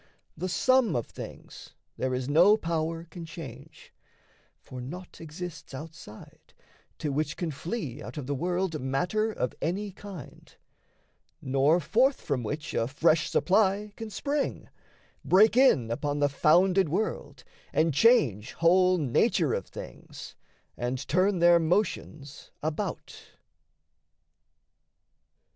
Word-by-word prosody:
The 185 +4 -4
sum 255 - +3
of 120 - -1
things - - -11 0.2
there 130 - -2
is 125 0 -3
no 175 +9 +5
power 165 -2 -2
can 170 +1 -10
change, 155 -3 -11 0.7
For 130 -1 -9
naught 175 +9 -9
exists 165 -2 -8
outside, 150 -7 -12 0.4
to 150 - -3
which 150 +2 -2
can 170 -3 -2
flee 150 - -5
Out - - -9
of 145 - -4
the 145 - -2
world 175 +2 -1
matter 180 +12 0
of 125 - -3
any 195 +5 -2
kind, 195 -4 -11 0.8
Nor 135 +5 +2
forth 245 - +2
from 140 -4 -2
which 145 +7 -5
a 115 - 0
fresh 160 +4 +2
supply 200 +1 +2
can 225 -1 -7
spring, 285 +6 -3 0.5
Break 210 +4 +5
in 190 - +4
upon 145 +4 -2
the 145 0 +2
founded 180 +5 +3
world, 210 +8 -3 0.3
and 160 -1 +2
change 140 - +3
Whole 180 +2 +4
nature 160 - +1
of 95 - -3
things, - - -10 0.4
and 125 +2 -3
turn 185 +7 +2
their 170 0 +6
motions 160 -4 -2
about. 155 -1 -4
165 Hz, 120 wpm, -28 LUFS, 140-190 Hz, 0.8 s, their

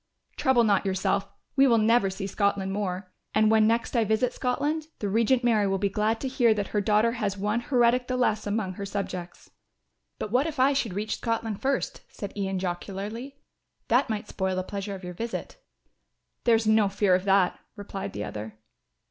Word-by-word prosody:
"Trouble 260 -4 +3
not 205 -3 +3
yourself, 195 0 0 0.3
you 275 0 +5
will 230 - +5
never 220 -1 +3
see 190 +1 -5
Scotland 200 -1 0
more; 185 -2 -3 0.2
and 215 0 +4
when 220 -1 +5
next 230 +3 0
I 230 - +4
visit 220 +4 +1
Scotland 295 +5 -1
the 205 - -3
Regent 230 +5 +2
Mary 220 -4 +3
will 195 0 +1
be 200 +1 0
glad 215 +3 0
to 270 - -2
hear 240 -4 +3
that 205 -2 -2
her 210 - 0
daughter 215 +3 +3
has 210 -5 -2
one 210 +4 0
heretic 245 0 +2
the 255 - -1
less 215 -4 +1
among 205 -2 -1
her 200 +2 -6
subjects." 185 -3 -5 0.7
"But 210 - -5
what 260 +6 +2
if 310 -4 -5
I 270 +2 +5
should 230 -9 -1
reach 215 +2 -2
Scotland 225 -3 -2
first," 275 0 -1
said 200 -2 -7
Ian 195 -2 -2
jocularly. 200 +8 -5 0.5
"That 245 +3 +3
might 210 -1 -3
spoil 190 -2 -2
the 185 - -1
pleasure 200 +1 -5
of 190 - -10
your 180 0 -6
visit." 230 - -5 0.9
"There 235 -2 +6
is 225 0 0
no 215 -2 +4
fear 200 -1 +2
of 185 +1 +2
that," 195 -2 +3 0.2
replied 200 -1 -6
the - - -4
other. 110 +1 -7
210 Hz, 195 wpm, -27 LUFS, 195-235 Hz, 0.9 s, There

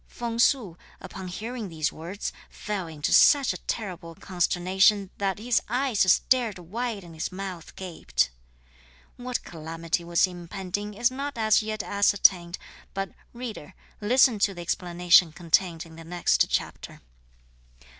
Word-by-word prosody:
Feng 235 -1 -5
Su, 235 -8 +3 0.2
upon 190 -1 -8
hearing 220 +3 -5
these 160 -2 -2
words, 175 +6 -6 0.2
fell 200 -4 -4
into 155 -2 -2
such 280 -3 +6
a - - -8
terrible 180 -6 -5
consternation 190 +3 +2
that 195 -2 0
his 235 +3 +1
eyes 245 -6 +2
stared 240 -5 +2
wide 210 +4 -4
and 170 -1 -12
his 160 +2 -4
mouth 185 -3 -7
gaped. 65 - -1 0.9
What 250 0 -3
calamity 165 +1 -4
was 170 +1 +3
impending 190 +3 -5
is 235 +4 +2
not 275 0 -5
as 220 -1 +4
yet 215 -1 -3
ascertained, 195 -3 +3 0.4
but, 195 0 -3 0.2
reader, 225 -8 -8 0.3
listen 240 +1 +4
to 200 -1 +2
the 175 - -7
explanation 175 0 +3
contained 170 0 +1
in 160 -1 -14
the 165 - -10
next 175 +1 +1
chapter. - - -3
190 Hz, 135 wpm, -26 LUFS, 170-220 Hz, 0.9 s, such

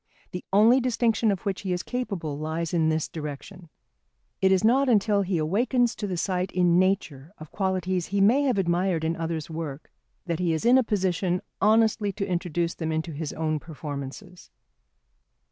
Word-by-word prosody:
The 180 - -6
only 220 +6 +6
distinction 235 -3 +1
of 195 - -3
which 200 -3 -3
he 190 - -3
is 180 0 -1
capable 195 - -4
lies 160 +2 -3
in 160 -2 +2
this 160 -1 0
direction. 160 +3 -8 0.7
It 190 0 +4
is 190 0 +3
not 260 +4 +4
until 210 -2 +3
he 190 -2 -1
awakens 235 - +1
to 210 - -3
the 185 -2 -3
sight 185 +1 -1
in 175 -1 +3
nature 170 -6 -1
of 155 -1 -12
qualities 185 -2 -1
he 200 +1 -1
may 225 +8 +5
have 255 -6 +1
admired 175 -2 +1
in 160 +1 0
others' 165 -1 -4
work 155 -3 -6 0.3
that 170 -3 -2
he 175 -2 +1
is 160 - -3
in 250 +2 +6
a - - +2
position 185 -4 0 0.2
honestly 220 -1 +3
to 195 0 -3
introduce 175 -2 -1
them 160 -1 -4
into 160 +1 -2
his 155 0 -5
own 155 -1 -1
performances. 150 +4 -8
180 Hz, 180 wpm, -26 LUFS, 160-205 Hz, 0.7 s, only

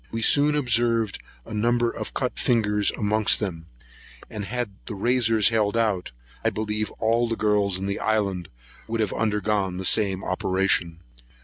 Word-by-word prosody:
We 115 0 -2
soon 150 +3 +4
observed 115 -5 +1 0.3
a - - -9
number 120 +2 +1
of - - -7
cut 125 -2 -2
fingers 105 -4 +2
amongst 105 0 +2
them; 85 -6 -4 0.6
and 105 -2 -5
had 120 +1 -3 0.2
the 105 - -5
razors 115 0 +3
held 110 -1 +1
out, 105 - 0 0.3
I - - +3
believe 105 0 -3
all 115 +2 +1
the 115 - -2
girls 105 -3 +1
in 95 - -4
the 100 0 -2
island 100 -5 -1 0.4
would 115 0 -3
have 105 -3 0
undergone 105 -3 0
the 95 - -4
same 95 -2 +2
operation. 95 -2 0
105 Hz, 155 wpm, -24 LUFS, 100-115 Hz, 0.6 s, soon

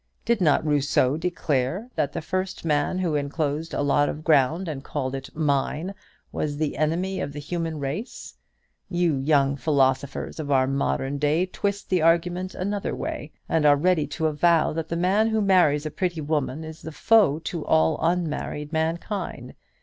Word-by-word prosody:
Did 235 -4 +1
not 155 -2 +3
Rousseau 145 -2 +2
declare 165 - -1
that 145 - -1
the - - -5
first 185 0 -3
man 150 +3 +1
who 180 -4 0
enclosed 150 +2 -2
a - - 0
lot 145 +1 +3
of 155 - -6
ground 155 +4 +3
and 140 -4 -5
called 135 -3 -3
it 135 0 -5
'mine' 150 +4 0 0.4
was 145 -1 -2
the 155 -1 -1
enemy 170 +6 -1
of 140 - -4
the 145 - -6
human 165 +1 -3
race? 145 - -5 0.6
You 175 -4 +1
young 140 0 +2
philosophers 135 +1 0
of 150 -2 -4
our 130 -2 +4
modern 135 - -1
day 150 +5 +2
twist 200 +2 -3
the 180 -3 +3
argument 175 +3 +1
another 200 +2 -2
way, 150 - -5 0.2
and 160 - +1
are 145 -1 +6
ready 165 0 +2
to 160 - -3
avow 160 +2 +3
that 160 0 -4
the 170 - -2
man 195 +5 +2
who 220 -1 +1
marries 180 -7 +3
a 155 - -3
pretty 175 -3 -2
woman 150 0 -2
is 160 0 -9
the 160 - -7
foe 205 -3 +4
to 165 0 -5
all 80 0 +2
unmarried 160 -3 -2
mankind. 160 - -3
155 Hz, 175 wpm, -25 LUFS, 145-175 Hz, 0.6 s, are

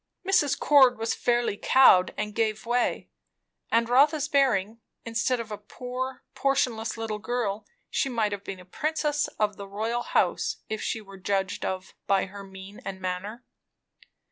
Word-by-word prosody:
Mrs. 295 -8 +3
Cord 265 -4 +5
was 225 +1 -1
fairly 240 -3 0
cowed, 195 -9 +6
and 210 0 -3
gave 220 -1 -1
way. 240 +1 0 0.6
And 230 0 +3
Rotha's 285 +4 +4
bearing; 235 -7 +2 0.3
instead 230 +2 0
of 225 -2 -6
a 210 - -5
poor, 250 +4 -6
portionless 255 -5 0
little 220 -2 -3
girl, 220 -3 -2 0.2
she 275 - 0
might 225 -4 0
have 200 -1 -5
been 190 -2 -6
a 180 - -13
princess 300 - -1
of 210 -2 0
the 200 - -7
house - - -21
royal, 225 +4 -1
if 215 - -8
she 225 - -2
were 195 -2 -13
judged 195 0 -1
of 185 0 -4
by 195 -1 +3
her 200 +1 -10
mien 190 +1 -11
and 190 -1 -6
manner. 190 +6 -5
225 Hz, 160 wpm, -27 LUFS, 200-250 Hz, 0.6 s, cowed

